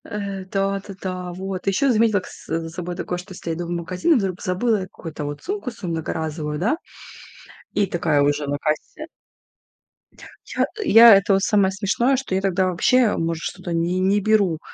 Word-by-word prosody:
Э, 200 -2 -5
да 195 0 0
да-да. 185 -2 -5
Вот, 190 +1 -5
и - - +6
еще 260 +8 +2
заметила 220 -3 +3
кс - - -13
за 165 0 -2
собой 175 +1 -5
такое, 180 -1 -3
что 185 +2 -10
если 170 -2 -5
я - - -2
иду 170 +1 -5
в - - -7
магазин, 180 - 0
и - - +4
вдруг 195 -6 -1
забыла 210 +4 +1
какую-то 165 -5 -7
вот 145 0 -6
сумку 395 -7 -3
свою 200 -7 -6
многоразовую, 155 -1 -3
да, 225 - +1 1.0
и 205 - +2
такая 160 -4 +1
уже 145 +1 +1
на 145 +1 -1
кассе 155 - -3 1.4
Я, - - -3
э, - - +3 0.2
я 230 - +9
это 195 +1 +3
вот 195 - +3
самое 200 -3 +3
смешное, 210 +7 +1
что 255 -7 -3
я 190 - +1
тогда 190 -1 +1
вообще, 220 +6 +3
может, 165 0 -2
что-то 185 -2 -5
не 170 +2 0
не 195 +2 +3
беру, 200 -6 +2
185 Hz, 190 wpm, -22 LUFS, 170-205 Hz, 1.4 s, я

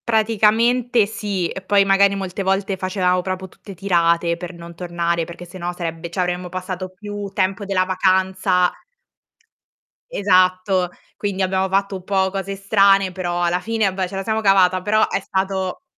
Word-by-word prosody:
Praticamente 225 +2 +3
sì 200 -4 -3
e 190 - -6
poi 200 +1 +3
magari 195 0 +4
molte 195 0 -4
volte 195 +1 0
facevamo 185 -1 0
proprio 185 +1 -4
tutte 195 +1 -13
tirate 170 -2 +2
per 175 +1 -7
non 170 0 -11
tornare, 170 -1 -2
perché 170 +1 -10
se 175 +2 -11
no 175 0 -3
sarebbe 170 -1 -5
cioè 180 +2 -1
avremmo 180 0 -3
passato 185 0 -5
più 205 +2 -7
tempo 195 +2 0
della 195 -2 +1
vacanza 185 -1 +2 1.4
Esatto, 185 -1 +2 0.3
quindi 200 -2 -3
abbiamo 190 0 0
fatto 195 +1 0
un 185 - -7
po' 190 0 +1
cose 195 0 -4
strane, 195 -1 +3
però 175 -1 -2
alla 175 +1 +1
fine 225 +2 0
vabbè 190 -1 -1
ce 195 - -8
la 195 - -3
siamo 220 +1 -1
cavata, 185 -2 +4
però 215 +3 +2
è - - -2
stato 190 +3 -2
190 Hz, 165 wpm, -20 LUFS, 180-200 Hz, 1.4 s, magari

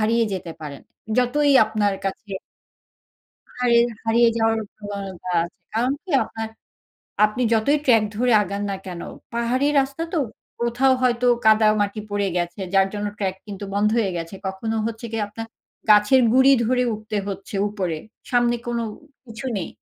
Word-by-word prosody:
হারিয়ে 230 +2 +2
যেতে 175 -3 -5
পারেন। 145 -3 -8 0.4
যতই 285 +4 +3
আপনার 210 -2 0
কাছে 195 +1 -4 1.3
হারিয়ে, 235 -1 +4 0.2
হারিয়ে 230 +1 +4
যাওয়ার 225 0 +2
প্রবণতা 195 -3 -6
আছে। 170 - -11 0.2
কারণ 245 +4 +1
কি 375 - -9
আপনার, 225 0 -6 0.8
আপনি 215 +4 0
যতই 230 +7 +3
ট্রাক 225 -5 +5
ধরে 245 +2 +2
আগান 200 +1 -4
না 195 - -2
কেন? 175 -2 -6 0.3
পাহাড়ি 240 +4 +1
রাস্তা 275 +4 -3
তো 335 - +1 0.4
কোথাও 240 +3 +3
হয়তো 245 0 +2 0.2
কাদা 215 0 +6
মাটি 205 +1 -1
পড়ে 205 -1 0
গেছে 175 +2 -2
যার 195 0 +5
জন্য 205 0 -2
ট্রাক 190 -2 -1
কিন্তু 200 -1 -7
বন্ধ 205 +1 +3
হয়ে 210 -4 +1
গেছে। 165 +2 -5
কখনো 220 +4 -3
হচ্ছে 230 +1 -5
গিয়ে 220 -2 -1
আপনার 225 +2 -7 0.4
গাছের 210 +5 +6
গুঁড়ি 265 +2 +6
ধরে 250 +2 +2
উঠতে 215 0 -5
হচ্ছে 195 +1 -7
উপরে, 185 -6 -3 0.3
সামনে 240 -1 +3
কোন 240 0 -1 0.5
কিছু 225 +1 -8
নেই। 185 - -3
220 Hz, 155 wpm, -23 LUFS, 200-240 Hz, 1.3 s, কাদা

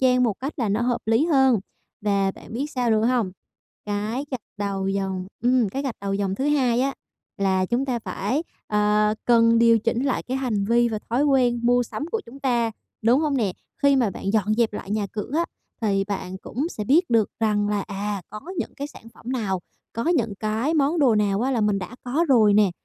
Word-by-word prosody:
gian 255 -1 +4
một 225 -5 +2
cách 275 +4 -3
là 230 - 0
nó 205 +3 +1
hợp 240 0 0
lý 225 +7 +3
hơn. 265 - +4 0.4
Và 200 -2 +1
bạn - - -13
biết 260 +6 -2
sao 245 -2 0
nữa 220 0 +3
hông? 240 -6 +1 0.6
Cái 210 +6 -2
gạch 255 -3 -3 0.2
đầu 200 -1 -2
dòng 190 -1 -2 0.2
ừm, 245 -2 +3
cái 270 +8 -3
gạch 265 -4 -3
đầu 195 0 -2
dòng 195 -1 -1
thứ 265 - -2
hai 255 -5 +2
á 275 +1 0 0.4
là 190 -1 +2
chúng 245 +7 0
ta 250 -3 -1
phải, 265 +6 -2 0.2
ờ, 210 0 +2
cần 230 -1 +5
điều 230 -1 +5
chỉnh 230 +3 0
lại 275 - 0
cái 260 +1 -3
hành 230 -7 -1
vi 235 +3 +3
và 220 -2 -2
thói 260 +5 +2
quen 250 -4 +3
mua 245 +1 +4
sắm 290 +5 -5
của 450 - -1
chúng 260 +4 -12
ta, 240 -4 +1 0.3
đúng 240 +6 +4
hông 295 -3 +1
nè? 210 -6 +1 0.3
Khi 280 -1 +5
mà 235 -6 +2
bạn 195 +2 -4
dọn 215 -1 +2
dẹp 230 -2 +2
lại 200 - -7
nhà 210 -1 0
cửa 210 +2 -5
á 335 - +2 0.4
thì 195 -2 +1
bạn 190 -2 -4
cũng 275 - -3
sẽ 215 -11 -5
biết 315 - +3
được 225 -3 +3
rằng 210 -2 +1
là, 205 -1 0
à, 200 -1 -4
có 215 +1 -7 0.2
những - - -3
cái 285 - -4
sản 230 -6 -14
phẩm 250 +2 -6
nào, 195 -7 -1 0.3
có 230 - -3
những 230 - +1
cái 220 +9 0
món 300 +3 +2
đồ 260 -6 +4
nào 205 -1 +1
á 260 - +1
là 245 -4 +1
mình 210 -1 +2
đã 220 +6 -7
có 280 +7 +1
rồi 220 -6 +5
nè, 205 -3 +5
230 Hz, 225 wpm, -24 LUFS, 205-255 Hz, 0.6 s, cần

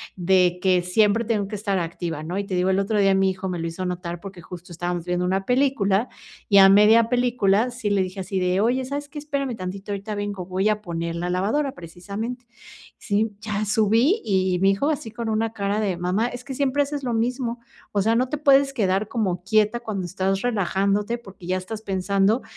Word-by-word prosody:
de 180 -1 +2
que 185 -1 +3
siempre 210 +5 +2
tengo 210 -3 0
que 210 - -5
estar 200 -1 -1
activa, 165 -2 -4
¿no? 175 +4 -4
Y - - -1
te 190 - -3
digo, 180 +1 +2
el 190 - +2
otro 205 +2 0
día 195 -1 +4
mi 190 0 +3
hijo 190 0 -5
me 175 -2 -3
lo 165 - -2
hizo 175 +3 -5
notar 175 -1 -4
porque 190 -1 -10
justo 180 0 -11
estábamos 175 0 -3
viendo 180 0 -1
una 190 +1 0
película, 250 -5 +2 0.4
y 200 - +5
a 195 - +9
media 215 +3 +6
película 245 -3 +2
sí 240 -3 -3
le 200 -1 +2
dije 185 +1 -5
así 190 +1 -3
de: 180 +1 +1
"Oye, 245 +4 +1
sabes 285 +2 -5
qué? 295 - -7
Espérame 280 -4 -3
tantito, 190 +2 -6
ahorita 205 +1 -4
vengo, 205 -3 -4
voy 190 +3 0
a 210 0 0
poner 170 -3 -4
la 175 +1 -3
lavadora" 220 +10 0
precisamente, 200 +8 -7 0.5
sí, 215 +1 0
ya 210 -1 -2
subí 225 - +3
y 190 -3 +1
me 195 - +4
dijo 200 +10 +1
así 265 -7 -3
con 235 0 -4
una 220 +1 0
cara 200 0 -1
de: 190 -4 -1
"Mamá, 180 +6 0
es 245 0 -7
que 275 - -6
siempre 280 +1 +1
haces 285 0 -5
lo 245 -2 -1
mismo, 240 +1 -1 0.3
o 200 - +1
sea, 225 +3 +2
no 250 +2 +1
te 300 - -2
puedes 275 -1 +4
quedar 195 -3 0
como 190 -6 -2
quieta 215 +3 +2
cuando 210 -6 -4
estás 190 +2 -1
relajándote 205 0 0
porque 195 -6 -13
ya 185 +1 0
estás 210 +4 -6
pensando 195 +3 +1
200 Hz, 215 wpm, -23 LUFS, 185-230 Hz, 0.5 s, a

